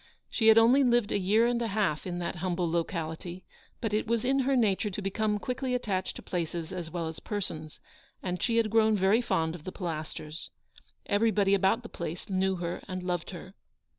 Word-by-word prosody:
She 225 - +2
had 220 0 +8
only 245 +5 +6
lived 240 -4 +3
a - - +1
year 210 +5 +3
and 240 0 +1
a 230 - 0
half 195 -7 0
in 175 -1 -3
that 175 0 -3
humble 175 0 -1
locality, 170 +1 -3 0.3
but 225 -3 -2
it 215 +1 0
was 230 +1 +1
in 270 +2 +3
her 270 +1 +2
nature 210 -3 +2
to 200 - -5
become 210 +2 0
quickly 250 +3 -2
attached 195 -6 -2
to - - -9
places 170 -1 -3
as 175 -3 -4
well 170 -1 -3
as 160 - -6
persons, 160 -7 -5 0.4
and 180 -1 -3
she 230 -1 +1
had 225 -2 +2
grown 220 -1 +4
very 195 +5 +4
fond 160 -8 0
of 170 -3 -9
the 185 - -5
Pilasters. 160 -2 -5 0.6
Everybody 205 -1 +3
about 200 +5 +3
the - - -7
place 170 +1 -6
knew 190 0 +2
her 175 -1 -4
and 185 -2 -4
loved 175 -2 -2
her. 185 +1 -9
190 Hz, 200 wpm, -29 LUFS, 175-225 Hz, 0.6 s, had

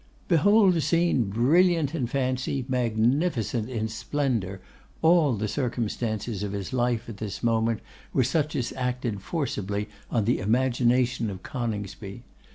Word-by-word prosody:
Behold 190 +3 +5
a 165 - +1
scene 170 -7 +2
brilliant 155 - +3
in 130 -8 -1
fancy, 130 0 -1
magnificent 120 - 0
in 110 -3 -2
splendour! 110 -5 -2 0.4
All 160 -6 +5
the 105 +1 -2
circumstances 115 -4 -2
of 105 -1 -3
his 100 +2 -4
life 120 -2 0
at 115 -4 -7
this 105 +1 -6
moment 115 -1 +1 0.3
were 130 - +2
such 150 +4 0
as 125 - -2
acted 125 -5 -2
forcibly 105 - -3 0.2
on 115 -4 +1
the 120 - +2
imagination 125 +1 +2
of 95 -2 -7
Coningsby. 105 -3 -5
120 Hz, 135 wpm, -26 LUFS, 110-135 Hz, 0.4 s, Behold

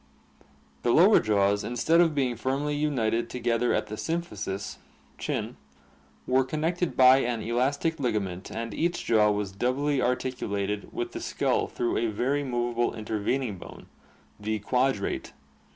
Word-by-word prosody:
The - - 0
lower 185 - +6
jaws 100 -1 +2
instead 160 +8 +3
of 165 -3 +2
being 130 -4 +1
firmly 140 +4 -1
united 120 -6 0
together 120 0 0
at - - +1
the 105 - -9
symphysis 105 - -4 0.4
(chin) - - -3 0.7
were 130 +1 +3
connected 160 +5 -2
by 130 0 +8
an 120 -4 -1
elastic 140 +7 0
ligament 100 -8 -2
and 115 -1 -5
each 170 +6 -1
jaw 110 -2 +4
was 105 -2 -1
doubly 130 +7 0
articulated 105 -6 -2
with - - -4
the - - -6
skull - - 0
through 120 - -1
a 115 - +1
very 130 +7 0
movable 120 -2 -1
inter 110 -1 -3
vening 110 -2 -1
bone, - - -11 0.5
the 110 +1 -1
quadrate. 125 0 -1
120 Hz, 140 wpm, -27 LUFS, 105-140 Hz, 0.7 s, by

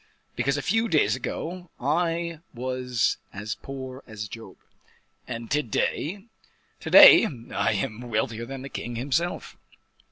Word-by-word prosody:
"Because 140 +1 0
a 145 - -3
few 225 +4 +1
days 155 -8 +3
ago 175 +1 -5
I 165 +3 -1 0.2
was 125 -1 -1
as 105 +2 -4
poor 130 -1 -8
as 110 -2 -6
Job." 105 -3 -10 0.7
"And 115 -2 -6
to 150 - +3
day?" 165 - -2 0.5
"To - - -6
day - - +10 0.3
I - - +1
am 110 +4 -4
wealthier 115 +1 -2
than 135 -1 -7
the 135 - -7
king 120 -2 -5
himself." 140 +8 -2
130 Hz, 135 wpm, -26 LUFS, 115-165 Hz, 0.7 s, day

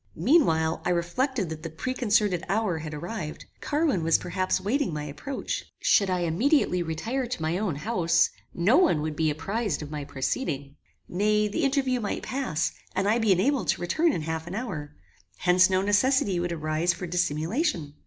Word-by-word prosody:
Meanwhile 160 - +3
I - - -1
reflected 190 - 0
that 160 -1 -6
the 165 - -5
preconcerted 210 -1 0
hour 195 -4 0
had 155 -1 -6
arrived. 155 +1 -6
Carwin 295 - 0
was 165 0 +4
perhaps 185 +1 -1
waiting 240 +6 0
my 150 -1 -4
approach. 150 - -4
Should 200 -2 +3
I 180 -1 0
immediately 180 - +2
retire 220 +11 -2
to 235 -8 -5
my 165 +3 0
own 200 -8 -1
house, 170 -1 +2 0.2
no 200 - +3
one 315 - +3
would 155 -1 -3
be 160 0 +1
apprized 185 +2 -2
of 150 - -8
my 150 -1 -4
proceeding. 140 - -3 0.3
Nay, 210 +3 +1
the 210 +11 -2
interview 270 -2 +1
might 210 -3 -3
pass, 245 - -1 0.2
and 190 +1 +1
I 220 +3 +3
be 220 -3 +2
enabled 245 +9 +2
to - - +1
return 315 - +2
in 165 - -3
half 160 +1 -4
an 180 - -5
hour. 180 -11 -5 0.4
Hence 180 +1 +4
no 185 0 +2
necessity 205 -2 +2
would 175 0 -2
arise 155 +1 0
for 180 - -6
dissimulation. 175 - -1
180 Hz, 175 wpm, -26 LUFS, 160-235 Hz, 0.4 s, was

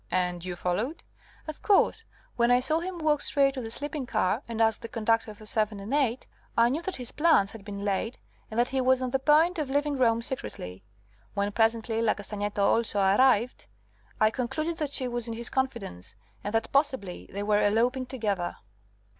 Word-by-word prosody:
"And 180 -1 -1
you 180 -1 -4
followed?" 205 - -2 0.4
"Of 310 - -7
course. 420 +2 +3 0.3
When 235 0 +3
I 245 0 +5
saw 310 +5 +2
him 360 +1 -5
walk 305 -3 +1
straight 275 -1 +3
to 265 - -4
the 225 - -6
sleeping 290 +2 -4
car, 205 +3 +1
and 230 -1 -5
ask 225 0 +2
the 230 - -6
conductor 225 -1 0
for 215 - -14
7 215 -1 0
and 205 +6 -5
8, 265 -4 +1 0.3
I 235 +1 +5
knew 290 +6 -1
that 375 +1 -4
his 250 -2 -4
plans 300 -11 +3
had 225 -3 -11
been 200 0 -6
laid, 205 +4 -1 0.3
and 220 - -2
that 245 - +3
he 265 0 0
was 260 0 +3
on 255 - -2
the 270 - +1
point 315 +5 +4
of 295 -3 -2
leaving 285 +1 0
Rome 230 -2 +3
secretly. 95 - -5 0.5
When, 200 0 0
presently, 225 +1 +1
La 225 -2 +2
Castagneto 205 0 -3
also 215 0 +2
arrived, 225 +4 +3 0.5
I 215 0 +4
concluded 310 +8 -2
that 300 -2 -2
she 265 -2 0
was 240 -1 -3
in 230 - -4
his 235 +1 -2
confidence, 235 - -3 0.3
and 205 - -3
that 225 0 0
possibly 265 - 0
they 200 +1 -4
were 210 0 +2
eloping 240 +5 +1
together." 205 -9 -2
235 Hz, 195 wpm, -28 LUFS, 205-270 Hz, 0.5 s, I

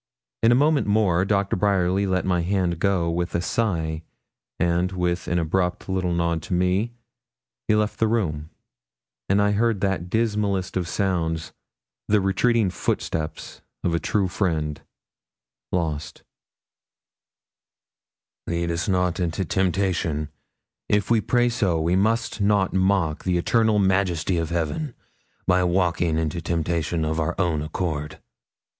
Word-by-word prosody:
In 115 - +5
a - - +6
moment 145 +1 +3
more 100 -4 +3
Doctor 100 -1 +1
Bryerly 95 0 +1
let 95 -1 0
my 90 -2 +1
hand 90 -2 0
go 90 -3 +1
with 85 +1 -2
a - - +2
sigh, 80 -7 -1 0.6
and 85 +1 +1
with 90 -1 -1
an 85 - 0
abrupt 90 +2 -1
little 95 -2 -1
nod 85 -1 0
to 90 - -3
me, 90 +6 +1 0.7
he 105 - +4
left 105 0 0
the 115 - +3
room; 80 -9 -1 0.8
and 100 +1 +3
I 105 0 +3
heard 110 0 +1
that 95 -3 -1
dismallest 105 -3 0
of 90 -2 -1
sounds, 85 -4 -1 0.5
the 105 0 +4
retreating 100 +2 +2
footsteps 80 -3 -3 0.2
of 85 - +1
a 85 - +1
true 100 +1 0
friend, 80 -6 -1 0.9
lost. 80 -4 -3 2.2
'Lead 85 0 -1
us 85 +1 -2
not 90 -2 +1
into 90 +1 -1
temptation; 90 -4 0 0.6
if 105 +1 +1
we 115 -2 +4
pray 120 +3 +2
so, 100 -8 +1
we 85 +3 +1
must 110 +3 0
not 100 -2 +2
mock 95 -4 +1
the 90 -1 +1
eternal 110 +4 +2
Majesty 95 -3 +1
of 80 -1 -2
Heaven 85 - -2 0.5
by 90 0 +3
walking 85 -2 +1
into 80 +1 -1
temptation 85 -1 -1
of 80 +1 -1
our 80 +2 -1
own 85 -5 +1
accord.' 75 -1 -3
90 Hz, 140 wpm, -24 LUFS, 85-100 Hz, 2.2 s, a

